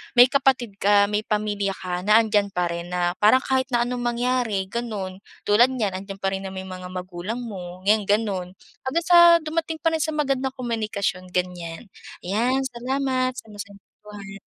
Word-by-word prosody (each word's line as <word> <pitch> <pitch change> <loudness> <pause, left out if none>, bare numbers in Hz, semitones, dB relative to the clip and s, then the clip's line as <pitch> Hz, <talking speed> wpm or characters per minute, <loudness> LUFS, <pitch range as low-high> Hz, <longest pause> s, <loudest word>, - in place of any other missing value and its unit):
may 245 +1 +7
kapatid 255 -7 +1
ka, 200 0 +4
may 210 +1 -1
pamilya 205 -2 -1
ka 180 -1 -4
na 215 +1 +7
andiyan 210 -2 +1
pa 180 -1 +1
rin. 170 0 -5
Na 175 -1 +1
parang 220 +5 +5
kahit 260 -1 0
na 240 -1 +2
anong 245 +1 -3
mangyari, 240 -4 0
ganun. 200 -4 -5 0.2
Tulad 235 +5 +4
niyan, 215 -6 0
andiyan 195 +1 -7
parin 195 0 -1
naman 190 0 -6
yung 190 -1 -8
mga 180 - -8
magulang 185 +5 -5
mo 185 -6 -8
ngayon, 210 +2 +3
ganun. 200 -3 0 0.4
Hanggang 335 +6 0
sa 345 -1 +8
dumating 320 0 -3
pa 330 0 +1
rin 320 - -1
sa 315 -1 -2
magandang 270 -3 -1
komunikasyon, 215 -6 -3
ganyan. 180 +1 -3 0.4
Yan, 240 +8 0
salamat 255 0 -1
sa 235 - -9
masayang 205 -1 -9 0.3
kwentuhan. 200 -2 -10
210 Hz, 175 wpm, -23 LUFS, 195-255 Hz, 0.4 s, sa